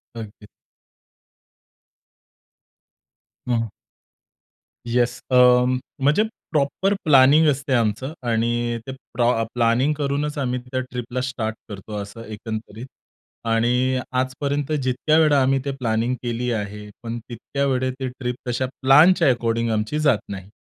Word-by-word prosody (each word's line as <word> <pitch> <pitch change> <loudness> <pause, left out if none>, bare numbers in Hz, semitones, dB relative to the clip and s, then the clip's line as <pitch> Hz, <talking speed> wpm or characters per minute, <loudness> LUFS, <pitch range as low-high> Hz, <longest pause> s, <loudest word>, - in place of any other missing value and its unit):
अगदी. 105 -2 -9 3.0
हं. 115 -3 0 1.2
येस 120 0 +1
अ, 130 - +2 0.6
म्हणजे 145 +9 +3 0.3
प्रॉपर 155 +7 +1
प्लॅनिंग 150 +2 +6
असते 140 -1 0
आमचं 115 +4 0
आणि 120 +1 0
ते - - -4 0.2
प्र 120 -1 +2
प्लॅनिंग 120 +5 +2
करूनच 145 +1 -1
आम्ही 125 -2 -1
त्या 130 - 0
ट्रिपला 125 0 -4
स्टार्ट 115 -4 -3
करतो 105 +1 -8
असं 100 +3 -9
एकंदरीत. 110 +1 -7 0.6
आणि 125 +3 +2 0.2
आजपर्यंत 140 +3 -2
जितक्या 130 +5 +1
वेळा 150 -3 +4
आम्ही 135 +1 +2
ते 140 - -1
प्लॅनिंग 115 0 0
केली 120 +1 -2
आहे, 105 -1 -5
पण 115 0 -4
तितक्या 140 +4 -3
वेळेस 130 -1 0
ते 130 - -2
ट्रिप 125 -1 -2
तशा 125 +2 0 0.2
प्लॅनच्या 150 +5 +6
एकॉर्डीन्ग 115 -1 0
आमची 110 +8 -1
जात 145 -7 +3
नाही. 95 -1 -7
125 Hz, 120 wpm, -22 LUFS, 115-140 Hz, 3.0 s, प्लॅनिंग